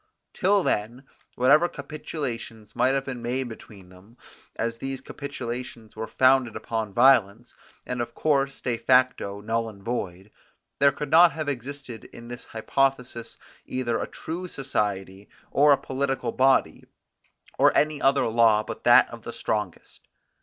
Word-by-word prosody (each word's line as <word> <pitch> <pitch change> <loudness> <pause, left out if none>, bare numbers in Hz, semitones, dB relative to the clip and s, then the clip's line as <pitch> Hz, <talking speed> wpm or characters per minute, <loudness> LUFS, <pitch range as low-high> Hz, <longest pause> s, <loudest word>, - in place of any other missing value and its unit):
Till 200 0 +2
then, 115 +6 -2 0.3
whatever 150 +7 +4
capitulations 140 -7 -6
might 130 +3 +2
have 135 0 -1
been 125 -3 -6
made 125 +2 -2
between 100 -4 -13
them, 95 +6 -18 0.4
as 115 0 -3
these 135 0 -4
capitulations 125 -5 -7
were 110 +1 -5
founded 130 -2 +3
upon 110 -1 -3
violence, 120 -1 +3 0.3
and 125 -1 -3
of 120 0 -6
course 140 -3 0
de 120 -2 -1
facto 125 -6 +2
null 115 +1 -1
and 100 -2 -14
void, 100 -4 -4 0.5
there 140 0 +5
could 140 +1 -6
not 170 +1 +7
have 155 -2 -4
existed 135 -2 -6
in 120 0 -12
this 120 0 -8
hypothesis 125 0 -2 0.3
either 120 -3 -2
a - - -3
true 175 +3 -6
society, 100 - -3 0.2
or 145 +1 +5
a 140 - +6
political 135 0 -2
body, 130 0 +2 0.8
or - - +6
any 150 -1 +1
other 135 -1 +3
law 110 -2 +4
but - - -8
that - - +7
of - - -9
the - - -7
strongest. - - -4
125 Hz, 145 wpm, -25 LUFS, 115-135 Hz, 0.8 s, not